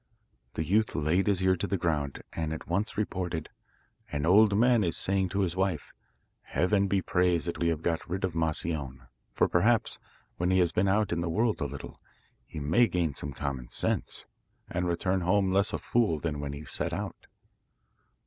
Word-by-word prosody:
The 80 - -1
youth 105 +7 +1
laid 85 +6 +1
his 95 -2 +2
ear 95 0 +4
to - - -2
the 100 - 0
ground 75 -5 -2
and 80 -1 -2
at 80 - -7
once 100 +6 -1
reported: 90 -6 -2 0.6
'An 75 +1 -1
old 100 +3 +5
man 120 -1 +4
is 85 - 0
saying 95 -1 +1
to 100 +3 -1
his 90 -3 0
wife, 95 -5 -1 0.5
"Heaven 100 +2 +1
be 95 -1 +1
praised 90 -2 +2
that 85 - -3
we 85 - +1
have 80 -1 -1
got 85 -1 -1
rid 95 +2 -3
of 95 - 0
Moscione, 80 -4 -2 0.3
for - - +2
perhaps, 110 +6 +2 0.4
when 90 +1 0
he 95 - +3
has 90 -2 +3
been 95 +2 +1
out 105 +1 +2
in 85 0 0
the 85 - -2
world 110 +2 +1
a - - +1
little, 70 -1 -8 0.5
he - - -7
may 80 +12 +3
gain 85 -7 0
some 70 +1 -5
common 65 -2 -4
sense, - - -2 0.4
and 90 0 -2
return 90 +2 0
home 95 +2 +2
less 100 +2 +3
of - - -3
a - - -20
fool 110 -10 +1
than 75 -2 -3
when 70 -1 -4
he 75 +2 -8
set - - -3
out." - - -5
90 Hz, 195 wpm, -29 LUFS, 80-95 Hz, 0.6 s, old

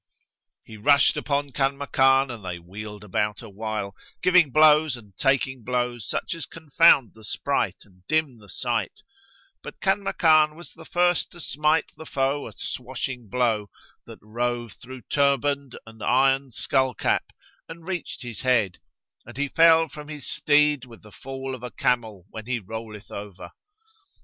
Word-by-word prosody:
He 110 - -12
rushed 140 +6 +4
upon 145 -1 -1
Kanmakan, 135 -1 +2
and 115 -4 -9
they 90 -2 -4
wheeled 105 +4 -9
about 105 +2 -2
awhile, 105 -2 -5 0.3
giving 180 -4 +5
blows 155 -1 +5
and 105 -5 -16
taking 130 -1 0
blows 120 -2 -2
such - - -2
as 165 -4 -6
confound 150 - +4
the 110 - -17
sprite - - -2
and 90 -3 -24
dim 155 -6 0
the 105 -2 -17
sight; 120 +3 -3 0.6
but - - -10
Kanmakan 160 -6 +3
was 170 +2 -11
the 160 - -14
first 175 +1 +1
to 175 - -12
smite 150 0 +1
the 160 - -10
foe 135 +1 -1
a - - -11
swashing 125 -2 -5
blow, 110 -4 0 0.4
that - - -10
rove 120 +1 -2
through 130 0 -11
turband 140 -1 +1
and 110 0 -14
iron 135 +1 +2
skull 130 +2 0
cap - - 0 0.4
and 165 +1 -11
reached 180 -6 -5
his 120 -3 -7
head, 115 -8 +1 0.5
and 120 - -11
he 145 0 -1
fell 165 +1 +5
from 150 0 -10
his 150 -3 -8
steed 150 -2 +3
with 115 -3 -14
the 105 - -15
fall 135 +2 -6
of 130 - -7
a 125 - -5
camel 110 -8 -1
when 110 0 -8
he 130 -1 0
rolleth 110 0 -8
over. 100 -2 -8
130 Hz, 155 wpm, -25 LUFS, 110-145 Hz, 0.6 s, giving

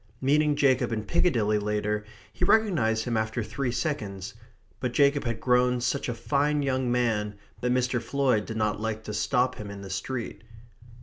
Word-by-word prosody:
Meeting 150 +2 +3
Jacob 130 -4 +2
in 110 -2 -2
Piccadilly 110 - +2
lately, 105 0 -1 0.3
he - - -4
recognized 155 - +3
him 120 -2 -1
after 110 +1 -1
three 120 +4 -2
seconds. 105 - -3 0.5
But 125 -2 -2
Jacob 140 +1 +3
had 115 -2 -2
grown 125 0 +3
such 125 +2 -1
a 120 - -2
fine 145 +5 +1
young 130 -2 0
man 110 -4 0 0.2
that 125 - 0
Mr. 125 -1 +1
Floyd 130 -7 +1
did 110 - -4
not 105 -1 0
like 110 0 -3
to 105 - -6
stop 125 +2 +1
him 105 -1 -7
in 100 0 -8
the 95 - -8
street. 115 +5 -4
120 Hz, 175 wpm, -27 LUFS, 110-135 Hz, 0.5 s, Meeting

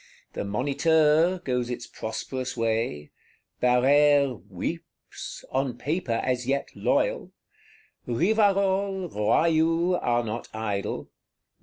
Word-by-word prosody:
The - - -3
Moniteur 150 - +2
goes 125 -3 -1
its 120 -1 -4
prosperous 125 +4 -5
way; 110 -10 -1 0.5
Barrère 135 - +4
"weeps," - - -7
on 135 -1 -1
Paper 145 -6 -1
as 125 -1 -1
yet 140 +1 0
loyal; - - 0 0.7
Rivarol, 195 - +1
Royou 165 - +2
are 120 0 +1
not 115 +1 -5
idle. 105 -3 -3
135 Hz, 95 wpm, -26 LUFS, 120-165 Hz, 0.7 s, Barrère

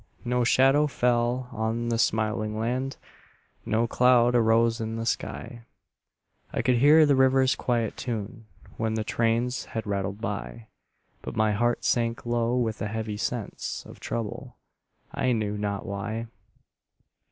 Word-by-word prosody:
No 125 0 +1
shadow 135 +5 +4
fell 125 -1 0
on 115 +1 -2
the 115 -1 0
smiling 110 -1 0
land, 125 +4 -2 0.7
No 115 +2 +2
cloud 120 0 +4
arose 115 0 +3
in 110 0 -3
the 115 0 -3
sky; 120 +1 -4 0.9
I - - -2
could 125 -1 +3
hear 150 +5 +7
the 145 -2 +4
river's 130 0 +4
quiet 120 -3 -1
tune 110 -1 -5 0.3
When 110 0 -1
the 110 - -1
trains 115 +3 0
had 110 - -2
rattled 100 0 -2
by; 110 +1 -5 0.5
But - - -7
my 110 -1 +2
heart 120 +3 0
sank 115 -1 0
low 120 +1 0
with 110 -4 -1
a 105 - -1
heavy 110 -1 -4
sense 115 0 -4
Of - - -13
trouble, 115 -3 -5 0.6
I 130 - +1
knew 105 -2 -1
not 100 -1 -3
why. 110 +3 -4
115 Hz, 140 wpm, -26 LUFS, 110-125 Hz, 0.9 s, hear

